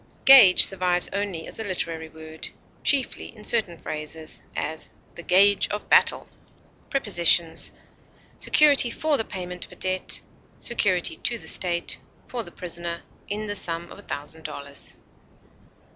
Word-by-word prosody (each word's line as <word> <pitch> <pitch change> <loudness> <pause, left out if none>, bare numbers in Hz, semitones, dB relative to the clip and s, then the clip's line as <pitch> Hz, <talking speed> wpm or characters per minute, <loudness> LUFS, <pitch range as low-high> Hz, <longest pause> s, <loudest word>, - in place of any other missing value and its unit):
Gage 255 -9 +9
survives 180 -2 0
only 200 -5 -3
as - - -10
a - - -3
literary 165 -5 -4
word, 160 0 -10 0.3
chiefly 275 -3 +1
in 210 - -13
certain 205 -8 +1
phrases; 155 +1 -6
as, 155 +2 -4 0.2
"the - - -10
gage 195 +3 +4
of 210 - -6
battle." - - +3 0.6
Prepositions: 175 -9 +3 0.7
Security 285 -5 +5
for 310 +5 0
the 225 - 0
payment 180 -3 -6
of - - -22
a - - -12
debt; 185 0 -2 0.4
security 185 -8 0
to 235 - -1
the - - -12
state, 175 -2 -1 0.3
for 245 - -4
the - - -9
prisoner, 170 -1 -5 0.2
in 210 +1 -4
the 205 -1 -4
sum 170 -2 0
of - - -11
a 205 - -16
thousand 150 +3 -7
dollars. 140 -2 -6
180 Hz, 145 wpm, -24 LUFS, 165-210 Hz, 0.7 s, Gage